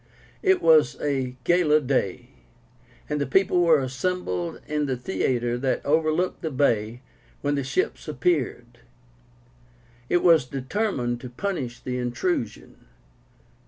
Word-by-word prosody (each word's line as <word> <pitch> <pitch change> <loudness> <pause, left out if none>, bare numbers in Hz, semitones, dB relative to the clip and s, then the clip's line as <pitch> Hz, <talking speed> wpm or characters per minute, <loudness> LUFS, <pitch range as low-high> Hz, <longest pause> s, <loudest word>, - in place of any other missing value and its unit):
It 380 -2 +2
was 155 -5 +5
a 135 -3 -2
gala 170 -2 +4
day, 130 -9 -1 0.8
and 150 -1 -2
the 140 - -1
people 180 +4 +3
were 165 -3 +5
assembled 130 - -3
in 150 -1 -1
the 130 -2 -1
theatre 120 +1 -1
that 130 0 -1
overlooked 155 +4 +1
the 160 - -2
bay 120 -4 0 0.4
when 145 0 0
the 140 -1 -1
ships 375 - -2
appeared. 120 - -1 1.3
It 175 - +2
was 165 -6 +5
determined 130 - -2
to 125 - -7
punish 125 -5 -4
the 125 0 -3
intrusion. 120 - -3
140 Hz, 125 wpm, -25 LUFS, 125-165 Hz, 1.3 s, was